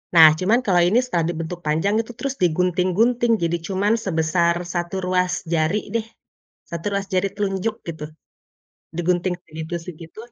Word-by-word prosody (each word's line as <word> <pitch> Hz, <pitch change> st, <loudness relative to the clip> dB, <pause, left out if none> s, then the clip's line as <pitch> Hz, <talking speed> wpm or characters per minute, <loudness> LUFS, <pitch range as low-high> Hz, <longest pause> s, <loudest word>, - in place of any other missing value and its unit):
Nah, 160 Hz, -1 st, +10 dB
cuman 215 Hz, +7 st, +3 dB
kalau 180 Hz, -3 st, +4 dB
ini 230 Hz, +6 st, +4 dB
setelah 170 Hz, -9 st, 0 dB
dibentuk 170 Hz, +1 st, -4 dB
panjang 160 Hz, +7 st, +1 dB
itu 230 Hz, -, -10 dB
terus 275 Hz, -1 st, -2 dB
digunting-gunting, 185 Hz, +8 st, +2 dB
jadi 170 Hz, +1 st, +1 dB
cuman 200 Hz, +3 st, +1 dB
sebesar 170 Hz, 0 st, +2 dB, 0.2 s
1 175 Hz, +1 st, -2 dB
ruas 180 Hz, 0 st, +1 dB, 0.2 s
jari 160 Hz, +4 st, +2 dB, 0.2 s
deh, 225 Hz, -1 st, 0 dB, 0.6 s
1 170 Hz, +1 st, -6 dB
ruas 200 Hz, 0 st, -1 dB
jari 185 Hz, +1 st, +2 dB
telunjuk 200 Hz, +2 st, -1 dB
gitu, 160 Hz, -2 st, -6 dB, 0.9 s
digunting 180 Hz, +1 st, +1 dB
segitu-segitu. 165 Hz, +2 st, -7 dB
180 Hz, 140 wpm, -22 LUFS, 165-200 Hz, 0.9 s, Nah